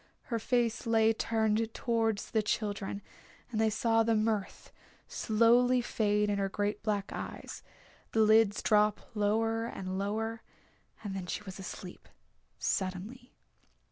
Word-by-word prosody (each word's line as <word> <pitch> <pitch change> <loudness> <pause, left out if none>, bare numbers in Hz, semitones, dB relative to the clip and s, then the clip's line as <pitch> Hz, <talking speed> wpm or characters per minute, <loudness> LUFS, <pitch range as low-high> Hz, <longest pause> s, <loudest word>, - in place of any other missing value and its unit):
Her 230 - +1
face 235 0 0
lay 225 -1 +4
turned 220 0 0
towards 225 -3 0
the 220 - +2
children, 205 -2 -2 0.5
and 220 -2 0
they 220 - +4
saw 225 +1 +2
the 225 0 +2
mirth 215 -2 -1 0.4
slowly 240 +3 +3
fade 210 -3 +1
in 205 -1 0
her 195 0 0
great 205 +2 -2
black 210 -2 -1
eyes, - - -7 0.5
the 225 - +2
lids 215 -1 +4
drop 210 0 +2
lower 225 +2 +1
and 190 -4 -4
lower, 220 +3 -2 0.6
and 205 -2 -4
then 185 -2 -5
she 210 - -4
was 190 -1 -9
asleep 185 -1 -9 0.5
suddenly. 200 +7 -3
215 Hz, 135 wpm, -31 LUFS, 205-225 Hz, 0.6 s, lay